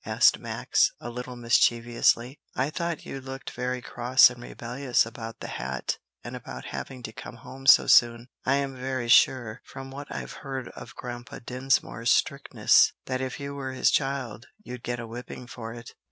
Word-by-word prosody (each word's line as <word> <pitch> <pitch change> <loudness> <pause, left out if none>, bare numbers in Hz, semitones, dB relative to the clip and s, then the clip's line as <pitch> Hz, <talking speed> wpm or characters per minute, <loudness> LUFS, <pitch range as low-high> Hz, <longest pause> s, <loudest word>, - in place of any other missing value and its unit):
asked - - +4
Max, - - +1
a 120 - -6
little 125 +1 -6
mischievously. 120 +2 +2 0.2
"I 135 +4 0
thought 170 0 -3
you 135 - -6
looked 130 0 -7
very 125 0 -3
cross 125 +1 +5
and 120 0 -11
rebellious 125 +2 0
about 115 0 -8
the - - -5
hat 65 +1 -3 0.2
and - - -7
about - - -8
having 130 -2 -6
to 110 - -6
come 120 - -9
home 135 +2 -10
so 130 - +9
soon. 120 0 +5 0.2
I'm 135 0 0
very 130 -2 -3
sure, 120 -1 +4
from 135 0 -9
what 140 +2 -8
I've - - -6
heard 135 -3 -5
of 110 - -11
Grandpa 120 0 -7
Dinsmore's 125 -2 0
strictness, 140 0 +4
that 130 0 -2
if 130 -2 -4
you 140 0 -5
were 135 -2 -5
his 130 - +3
child 130 -5 -1 0.2
you'd 125 - -8
get 120 0 -3
a 120 - -5
whipping 120 +2 -8
for 115 -2 -8
it." 115 -1 -10
125 Hz, 175 wpm, -27 LUFS, 120-135 Hz, 0.2 s, so